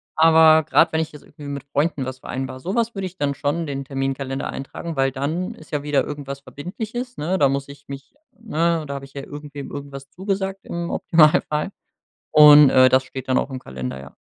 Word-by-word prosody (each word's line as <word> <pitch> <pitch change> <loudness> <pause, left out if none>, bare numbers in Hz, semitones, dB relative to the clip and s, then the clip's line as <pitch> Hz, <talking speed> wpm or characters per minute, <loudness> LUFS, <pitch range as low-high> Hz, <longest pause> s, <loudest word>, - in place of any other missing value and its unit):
Aber 160 0 +6
grad, 160 +2 +3
wenn 160 - +2
ich 160 - -4
jetzt 150 - -13
irgendwie 145 - -12
mit 140 -1 -6
Freunden 145 -1 -1
was 130 0 -6
vereinbar, 130 +1 -5
so 190 +7 -3
was 235 -1 0
würd 195 - -4
ich 185 0 -6
dann 145 -1 0
schon 145 +5 -1
in - - -3
den 140 -1 -4
Terminkalender 135 0 -3
eintragen, 160 +4 -6
weil 135 -1 +1
dann 160 - -3
ist - - -16
ja 145 -1 -2
wieder 145 -2 +1
irgendwas 140 -2 -6
Verbindliches, 220 - -7
ne? 175 +5 -1
Da 140 -2 +4
muss 140 0 -2
ich 140 0 -14
mich 140 - -9 0.3
ne, 170 -6 0
da 140 - -4
hab 140 - -6
ich 135 - -13
ja 140 -1 -6
irgendwem 145 -1 -8
irgendwas 140 -1 -8
zugesagt, 195 +2 -3
im 170 0 -4
Optimalfall. 155 +1 +3 0.6
Und, 150 -1 +9
äh, 130 0 +6
das 130 +1 +4
steht 130 0 -8
dann 130 - +3
auch 140 - -1
im 130 - -5
Kalender, 65 - -6
ja. 70 - -13
145 Hz, 215 wpm, -22 LUFS, 135-165 Hz, 0.6 s, Und